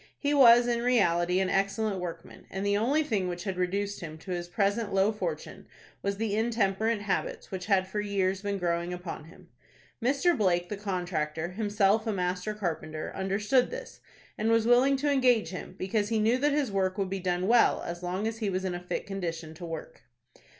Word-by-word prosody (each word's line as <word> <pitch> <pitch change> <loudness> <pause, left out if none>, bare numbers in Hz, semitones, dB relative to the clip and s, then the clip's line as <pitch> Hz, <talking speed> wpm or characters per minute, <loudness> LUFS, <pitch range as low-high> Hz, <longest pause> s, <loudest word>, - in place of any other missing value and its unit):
He 290 0 0
was 240 -4 +7
in 240 -1 0
reality 180 -7 +2
an 190 -1 0
excellent 200 +1 0
workman, 170 -2 -8
and 195 +1 -4
the 200 0 +2
only 265 +9 +2
thing 210 -10 -1
which 175 0 -4
had 195 -3 -3
reduced 200 +3 -1
him 155 -3 -7
to 185 +4 -9
his 175 -1 -3
present 200 +4 0
low 195 +2 +3
fortune 220 - -5 0.3
was 200 0 -2
the 215 -1 -1
intemperate 220 -1 +1
habits 205 -2 -3
which 190 0 -5
had 190 -2 +3
for 210 +2 -2
years 195 -2 0
been 200 -1 -2
growing 170 -1 -1
upon 175 -3 -6
him. 165 - -17 0.5
Mr. 280 +7 +3
Blake, 175 -4 +1
the 210 - -3
contractor, 175 -5 -2
himself 210 +2 +1
a - - +1
master 180 +2 -2
carpenter, 160 -5 -4
understood 205 +7 +1
this, - - -8 0.4
and 220 +1 +1
was 230 -1 +3
willing 250 +3 +5
to 290 +2 +1
engage 250 -9 +3
him, 180 0 -7
because 205 +2 -1
he 225 - +1
knew 225 +4 +2
that 295 +2 +2
his 285 -6 0
work 190 0 0
would 195 -2 -1
be 195 - -2
done 180 0 -1
well 235 +1 +4
as 175 0 -5
long 185 +4 -2
as 225 0 -4
he 215 -3 -1
was 190 0 -2
in 185 - -1
a 175 - -4
fit 180 - -4
condition 165 -5 -4
to 170 +2 -8
work. 165 -1 -7
195 Hz, 200 wpm, -29 LUFS, 180-225 Hz, 0.5 s, was